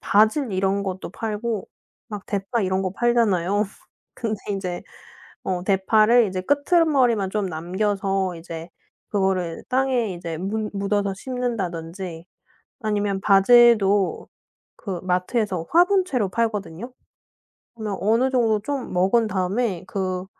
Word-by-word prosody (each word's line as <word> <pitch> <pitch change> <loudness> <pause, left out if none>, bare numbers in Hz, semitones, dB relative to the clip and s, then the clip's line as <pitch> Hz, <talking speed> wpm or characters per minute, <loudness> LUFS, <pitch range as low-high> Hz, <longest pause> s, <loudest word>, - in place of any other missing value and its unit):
바질 220 +4 +3
이런 195 +1 +1
것도 190 -2 -4
팔고 220 0 -3 0.4
막 210 -3 -7
대파 205 +4 -2
이런 190 0 0
거 185 - -1
팔잖아요. 205 -3 +2 0.5
근데 220 -3 -3
인제 185 -3 -3 0.6
어 180 -2 -2
대파를 215 +5 +4
이제 185 0 -3
끄트머리만 285 - +2
좀 205 -1 -1
남겨서 190 +2 -1
이제 165 0 -8 0.4
그거를 190 -4 -1
땅에 255 -5 +1
이제 170 -2 -5
문 210 +4 -2
묻어서 200 0 0
심는다든지 185 -8 -4 0.5
아니면 205 -3 -1
바질도 205 -1 +5 0.5
그 190 -5 -5
마트에서 185 0 -1
화분째로 350 - +3
팔거든요. 215 0 -2 0.8
그러면 215 -3 -4
어느 230 +6 +3
정도 225 -4 +2
좀 270 0 -4
먹은 195 +6 +3
다음에 195 0 -1
그 185 -2 -3
200 Hz, 260 characters per minute, -23 LUFS, 185-230 Hz, 0.8 s, 바질도